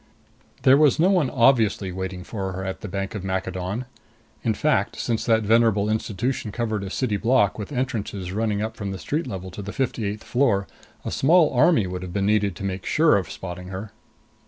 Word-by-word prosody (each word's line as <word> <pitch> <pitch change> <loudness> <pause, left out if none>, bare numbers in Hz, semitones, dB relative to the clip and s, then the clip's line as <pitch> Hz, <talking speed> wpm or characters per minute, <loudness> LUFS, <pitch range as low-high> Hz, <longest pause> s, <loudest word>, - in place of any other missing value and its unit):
There 130 +1 +7
was 150 -4 +4
no 180 +4 +5
one 175 -9 +2
obviously 115 -7 +3
waiting 95 0 -5
for 95 -2 -4
her 95 +1 -5
at 95 - -5
the - - -5
Bank 95 0 -4
of 105 -4 -5
Maccadon. 95 +4 -3 0.6
In 110 -2 +1
fact, 150 +6 +1
since 115 -2 -1
that 110 -2 +3
venerable 110 -1 +3
institution 110 +2 -2
covered 110 -2 -2
a 95 - -5
city 110 0 -1
block, 115 -3 +2
with 105 - -6
entrances 105 -8 -3
running 105 0 -1
up 110 0 -4
from 100 -2 -5
the 95 - -4
street 150 - -2
level 95 -1 -6
to 95 - -7
the 100 +1 -6
fifty 125 -4 -2
eighth 105 +2 -5
floor, 115 -7 +1 0.4
a - - -3
small 160 +2 +4
army 125 - +4
would 90 0 -5
have 90 -1 -7
been 100 0 0
needed 105 -3 +2
to 100 - -8
make 95 -1 -3
sure 155 0 +4
of 95 -5 -1
spotting 90 -1 -7
her. 95 +3 -6
105 Hz, 205 wpm, -24 LUFS, 95-120 Hz, 0.6 s, There